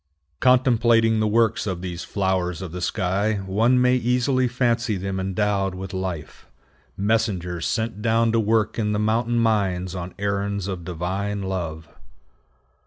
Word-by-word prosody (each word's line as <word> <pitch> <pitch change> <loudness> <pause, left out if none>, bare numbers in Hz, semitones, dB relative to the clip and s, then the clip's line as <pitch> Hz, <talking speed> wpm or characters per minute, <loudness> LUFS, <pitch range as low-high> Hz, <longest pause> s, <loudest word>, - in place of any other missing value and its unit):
Contemplating 120 -3 +4
the 110 - +2
works 110 0 +2
of 90 -2 -3
these 85 -2 -5
flowers 95 -3 -1
of 90 - -6
the 90 +1 -6
sky, 100 +3 0
one 115 +7 +3
may 125 0 +4
easily 125 +2 +1
fancy 120 -3 0
them 95 +1 -3
endowed 95 0 0
with 95 +1 -7
life: 95 -4 -5 0.5
messengers 95 -5 0
sent 110 -2 -2
down 115 0 +2
to 115 - +2
work 110 0 +1
in 105 -1 0
the 105 - 0
mountain 115 +3 +1
mines 95 -6 +1
on 90 -1 -6
errands 100 -1 -2
of 95 -3 -4
divine 95 +4 -3
love. 85 -4 -4
100 Hz, 145 wpm, -23 LUFS, 95-115 Hz, 0.5 s, Contemplating